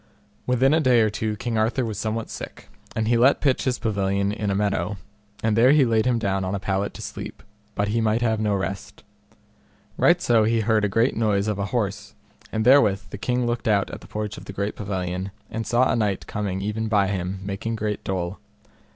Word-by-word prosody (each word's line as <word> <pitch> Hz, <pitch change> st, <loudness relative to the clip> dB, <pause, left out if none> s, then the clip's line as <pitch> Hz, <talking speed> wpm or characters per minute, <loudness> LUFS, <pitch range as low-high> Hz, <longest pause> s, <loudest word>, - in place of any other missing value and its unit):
Within 130 Hz, +3 st, +3 dB
a 160 Hz, -, +4 dB
day 125 Hz, -6 st, +4 dB
or 110 Hz, -1 st, +2 dB
two 110 Hz, 0 st, -2 dB
King 115 Hz, +1 st, -2 dB
Arthur 120 Hz, +3 st, +1 dB
was 110 Hz, -3 st, -4 dB
somewhat 110 Hz, +1 st, -3 dB
sick, -, -, -8 dB, 0.3 s
and 110 Hz, 0 st, 0 dB
he 120 Hz, +1 st, +3 dB
let 130 Hz, +4 st, +5 dB
pitch 135 Hz, -3 st, +1 dB
his 125 Hz, -2 st, +1 dB
pavilion 100 Hz, -2 st, 0 dB
in 105 Hz, -1 st, -2 dB
a 100 Hz, -, 0 dB
meadow, 100 Hz, -1 st, -1 dB, 0.5 s
and 110 Hz, -1 st, +2 dB
there 125 Hz, +5 st, +6 dB
he 145 Hz, -3 st, +5 dB
laid 115 Hz, -1 st, +2 dB
him 125 Hz, -2 st, +2 dB
down 95 Hz, -3 st, -1 dB
on 95 Hz, +1 st, -2 dB
a -, -, -2 dB
pallet 95 Hz, +1 st, -2 dB
to -, -, -7 dB
sleep, -, -, -7 dB, 0.3 s
but 100 Hz, 0 st, 0 dB
he 115 Hz, +2 st, +1 dB
might 110 Hz, +2 st, +1 dB
have 110 Hz, -2 st, +1 dB
no 105 Hz, -2 st, +1 dB
rest. 95 Hz, 0 st, -5 dB, 0.9 s
Right -, -, +4 dB
so 115 Hz, -2 st, +3 dB
he 115 Hz, +1 st, +2 dB
heard 110 Hz, 0 st, +2 dB
a 105 Hz, -, +2 dB
great 115 Hz, +6 st, +2 dB
noise 105 Hz, -2 st, +1 dB
of 105 Hz, -2 st, -1 dB
an 100 Hz, -, -1 dB
horse, 105 Hz, -2 st, -3 dB, 0.4 s
and 110 Hz, 0 st, -1 dB
therewith 120 Hz, -7 st, +4 dB
the 100 Hz, -, -7 dB
king 125 Hz, +2 st, 0 dB
looked 120 Hz, +1 st, -2 dB
out 100 Hz, -3 st, +2 dB
at -, -, -8 dB
the 90 Hz, -, -13 dB
porch 105 Hz, 0 st, -4 dB
of -, -, -13 dB
the 100 Hz, +1 st, -3 dB
pavilion, 95 Hz, -2 st, -3 dB, 0.2 s
and 110 Hz, -1 st, -4 dB
saw 120 Hz, +3 st, +3 dB
a -, -, +1 dB
knight 105 Hz, -4 st, -1 dB
coming 100 Hz, -2 st, -3 dB
even 105 Hz, +2 st, -2 dB
by 105 Hz, -2 st, +3 dB
him, 95 Hz, -1 st, -3 dB
making 100 Hz, +3 st, -3 dB
great 105 Hz, -1 st, -3 dB
dole. 90 Hz, 0 st, -3 dB
105 Hz, 220 wpm, -24 LUFS, 100-115 Hz, 0.9 s, there